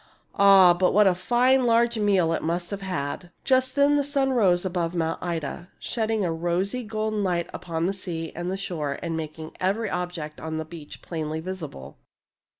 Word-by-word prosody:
" -, -, -40 dB
Ah, 195 Hz, -3 st, +7 dB
but 180 Hz, +2 st, +1 dB
what 210 Hz, 0 st, +6 dB
a 190 Hz, -, +5 dB
fine 245 Hz, +8 st, +3 dB
large 235 Hz, -1 st, +3 dB
meal 190 Hz, -6 st, +3 dB
it -, -, -1 dB
must 175 Hz, +3 st, -2 dB
have 200 Hz, -1 st, -4 dB
had! 175 Hz, -2 st, -4 dB
" -, -, -44 dB
Just 260 Hz, -1 st, +2 dB
then 285 Hz, +1 st, +4 dB
the 285 Hz, -, +2 dB
sun 275 Hz, -1 st, +1 dB
rose 190 Hz, -8 st, +3 dB
above 175 Hz, -2 st, -1 dB
Mount 165 Hz, -1 st, -1 dB
Ida, 170 Hz, 0 st, -4 dB
shedding 220 Hz, -3 st, -1 dB
a 165 Hz, -, 0 dB
rosy 175 Hz, +8 st, -1 dB
golden 215 Hz, -1 st, -2 dB
light 175 Hz, -3 st, 0 dB
upon 170 Hz, +2 st, -2 dB
sea 165 Hz, -4 st, -5 dB
and 180 Hz, +3 st, -3 dB
shore 155 Hz, -7 st, -3 dB
and 165 Hz, -1 st, -2 dB
making 160 Hz, 0 st, -6 dB
every 200 Hz, +3 st, 0 dB
object 175 Hz, -4 st, -4 dB
on 160 Hz, 0 st, -4 dB
the 160 Hz, -, -3 dB
beach 160 Hz, -2 st, -11 dB
plainly 155 Hz, -2 st, -4 dB
visible. 160 Hz, -, -7 dB
180 Hz, 185 wpm, -25 LUFS, 165-210 Hz, -, Ah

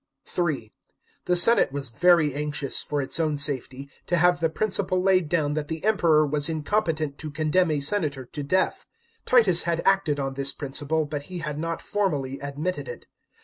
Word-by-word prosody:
(3) 155 Hz, -11 st, -3 dB, 0.5 s
The 180 Hz, -, +1 dB
senate 180 Hz, -, +5 dB
was 140 Hz, -2 st, -4 dB
very 165 Hz, 0 st, +3 dB
anxious, 145 Hz, -1 st, -1 dB
for 145 Hz, -1 st, -2 dB
its 135 Hz, +4 st, 0 dB
own 155 Hz, -2 st, 0 dB
safety, 140 Hz, -1 st, 0 dB, 0.2 s
to 175 Hz, -, +1 dB
have 175 Hz, +1 st, +3 dB
the 165 Hz, -1 st, +1 dB
principle 185 Hz, 0 st, 0 dB
laid 185 Hz, -3 st, +2 dB
down 150 Hz, -4 st, 0 dB
that 150 Hz, -1 st, -3 dB
the 160 Hz, 0 st, -6 dB
Emperor 170 Hz, -8 st, +3 dB
was 145 Hz, +1 st, +1 dB
incompetent 155 Hz, -3 st, -2 dB
to 155 Hz, -, -6 dB
condemn 155 Hz, +4 st, +1 dB
a 150 Hz, -2 st, -1 dB
senator 145 Hz, -5 st, 0 dB
to 145 Hz, -, -7 dB
death. 185 Hz, +7 st, -1 dB, 0.4 s
Titus 215 Hz, -9 st, +5 dB
had 170 Hz, 0 st, -1 dB
acted 190 Hz, -7 st, +2 dB
on 135 Hz, -1 st, -3 dB
this 140 Hz, +1 st, +2 dB
principle, 145 Hz, +2 st, -2 dB
hut 145 Hz, -2 st, -3 dB
he 180 Hz, -, -6 dB
had 150 Hz, -3 st, -5 dB
not 165 Hz, +1 st, -4 dB
formally 145 Hz, -10 st, -2 dB
admitted 145 Hz, +6 st, -4 dB
it. 485 Hz, -, -9 dB
155 Hz, 180 wpm, -24 LUFS, 145-180 Hz, 0.5 s, senate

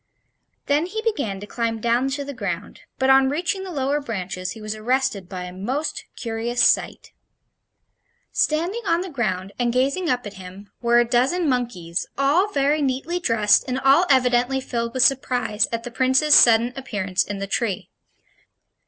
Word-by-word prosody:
Then 295 Hz, +4 st, +1 dB
he 435 Hz, +4 st, -4 dB
began 280 Hz, -, -2 dB
to -, -, -6 dB
climb 230 Hz, +1 st, -3 dB
down 235 Hz, +4 st, +1 dB
to 285 Hz, +1 st, -4 dB
the 280 Hz, -, -6 dB
ground, 255 Hz, -, -5 dB, 0.2 s
but 265 Hz, 0 st, +3 dB
on 265 Hz, 0 st, +5 dB
reaching 350 Hz, +6 st, -2 dB
the 380 Hz, -, -7 dB
lower 285 Hz, -2 st, -1 dB
branches 185 Hz, -7 st, -5 dB
he -, -, -12 dB
was 215 Hz, 0 st, -5 dB
arrested 220 Hz, -4 st, -1 dB
by 180 Hz, -1 st, -6 dB
a 180 Hz, 0 st, -8 dB
most 255 Hz, +12 st, -3 dB
curious 235 Hz, +1 st, -1 dB
sight. -, -, -1 dB, 1.2 s
Standing 340 Hz, +9 st, 0 dB
on 335 Hz, +1 st, +2 dB
the 370 Hz, -1 st, -6 dB
ground, 195 Hz, -8 st, -2 dB
and 240 Hz, -1 st, +1 dB
gazing 280 Hz, +8 st, 0 dB
up 250 Hz, -3 st, 0 dB
at 205 Hz, -, -7 dB
him, 185 Hz, +3 st, -12 dB
were 235 Hz, 0 st, +3 dB
a 240 Hz, -, +5 dB
dozen 260 Hz, +9 st, +1 dB
monkeys, 220 Hz, -10 st, -2 dB
all 290 Hz, +8 st, +3 dB
very 290 Hz, -4 st, +1 dB
neatly 280 Hz, +6 st, -1 dB
dressed 220 Hz, -9 st, +3 dB
and 255 Hz, 0 st, -2 dB
all 275 Hz, +7 st, +4 dB
evidently 250 Hz, 0 st, +3 dB
filled 235 Hz, -2 st, -4 dB
with 255 Hz, -, +3 dB
surprise 250 Hz, -4 st, +1 dB
at 230 Hz, 0 st, -3 dB
the 245 Hz, -, -7 dB
Prince's 260 Hz, +4 st, +3 dB
sudden 235 Hz, 0 st, +6 dB
appearance 205 Hz, -9 st, -2 dB
in 205 Hz, -, -6 dB
the 195 Hz, -, -4 dB
tree. 200 Hz, -1 st, -3 dB
250 Hz, 170 wpm, -22 LUFS, 220-280 Hz, 1.2 s, sudden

